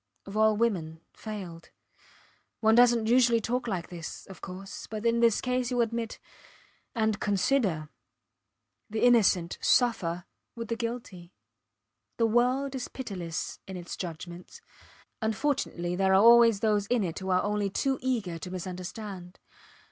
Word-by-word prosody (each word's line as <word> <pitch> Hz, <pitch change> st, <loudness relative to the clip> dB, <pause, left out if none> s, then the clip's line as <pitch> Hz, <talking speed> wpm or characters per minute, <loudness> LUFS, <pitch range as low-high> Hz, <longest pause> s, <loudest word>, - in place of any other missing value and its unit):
of 195 Hz, -, -9 dB
all 215 Hz, 0 st, +4 dB
women 175 Hz, -9 st, -1 dB
failed. 185 Hz, -6 st, -8 dB, 0.9 s
One 220 Hz, 0 st, +4 dB
doesnt 235 Hz, -1 st, +5 dB
usually 240 Hz, -1 st, +4 dB
talk 245 Hz, +3 st, -2 dB
like 185 Hz, -6 st, -3 dB
this 170 Hz, -2 st, -7 dB
of 190 Hz, -, -12 dB
course 195 Hz, +1 st, -8 dB
but 215 Hz, 0 st, -6 dB
in 230 Hz, 0 st, +3 dB
this 230 Hz, -2 st, +3 dB
case 250 Hz, -1 st, 0 dB
youll 245 Hz, -1 st, +1 dB
admit... 230 Hz, 0 st, -3 dB, 0.8 s
And 220 Hz, -2 st, +1 dB
consider 200 Hz, -, +1 dB, 1.0 s
the 220 Hz, +1 st, -2 dB
innocent 205 Hz, -8 st, +4 dB
suffer 180 Hz, -8 st, +2 dB, 0.3 s
with 230 Hz, -2 st, -6 dB
the 230 Hz, -, 0 dB
guilty. 230 Hz, -7 st, -6 dB, 0.8 s
The 230 Hz, -, +3 dB
world 250 Hz, +4 st, +2 dB
is 260 Hz, -2 st, -4 dB
pitiless 180 Hz, -10 st, -5 dB
in 190 Hz, -1 st, -6 dB
its 175 Hz, -1 st, -7 dB
judgments. 175 Hz, 0 st, -8 dB, 0.6 s
Unfortunately 220 Hz, -6 st, -1 dB
there 190 Hz, +1 st, +2 dB
are 190 Hz, +2 st, +6 dB
always 230 Hz, -3 st, +7 dB
those 210 Hz, -2 st, +1 dB
in 240 Hz, -2 st, +1 dB
it 170 Hz, -4 st, -3 dB
who 190 Hz, 0 st, -5 dB
are 185 Hz, 0 st, +3 dB
only 205 Hz, -1 st, 0 dB
too 265 Hz, +6 st, 0 dB
eager 220 Hz, -10 st, -2 dB
to 180 Hz, -, -7 dB
misunderstand. 185 Hz, +1 st, -7 dB
215 Hz, 140 wpm, -28 LUFS, 180-235 Hz, 1.0 s, always